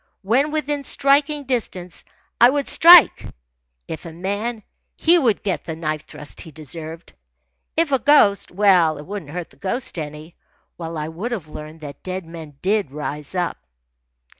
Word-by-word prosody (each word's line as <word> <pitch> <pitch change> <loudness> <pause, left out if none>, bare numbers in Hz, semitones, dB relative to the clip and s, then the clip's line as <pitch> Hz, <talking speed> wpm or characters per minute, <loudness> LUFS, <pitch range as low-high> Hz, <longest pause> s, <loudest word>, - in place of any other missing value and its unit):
When 250 +9 +2
within 295 -2 -2
striking 285 +2 +2
distance, 210 -9 -3 0.3
I 240 - +8
would 280 +1 -1
strike. 340 -1 +8 0.6
If 160 - -6
a - - -8
man, 205 +6 -4 0.3
he 340 +2 +4
would 235 - +1
get 195 -3 -2
the 160 - -5
knife 155 -2 -4
thrust 150 - -9
he 165 - -11
deserved. 160 +2 -9 0.6
If 325 -3 +2
a 270 - +3
ghost, 220 -7 +4
well, 180 -5 +3
it 145 - -9
wouldn't 195 -6 -7
hurt 175 +2 -6
the - - -21
ghost 220 -1 -3
any, 150 +2 -8 0.4
while 165 -1 -6
I 150 0 -3
would 180 +10 -5
have 185 -10 -5
learned 155 +1 -10
that 145 -2 -9
dead 185 -1 -5
men 160 -4 -11
did 200 -4 +1
rise 150 +2 -6
up. 175 -2 -1
185 Hz, 165 wpm, -21 LUFS, 160-245 Hz, 0.6 s, I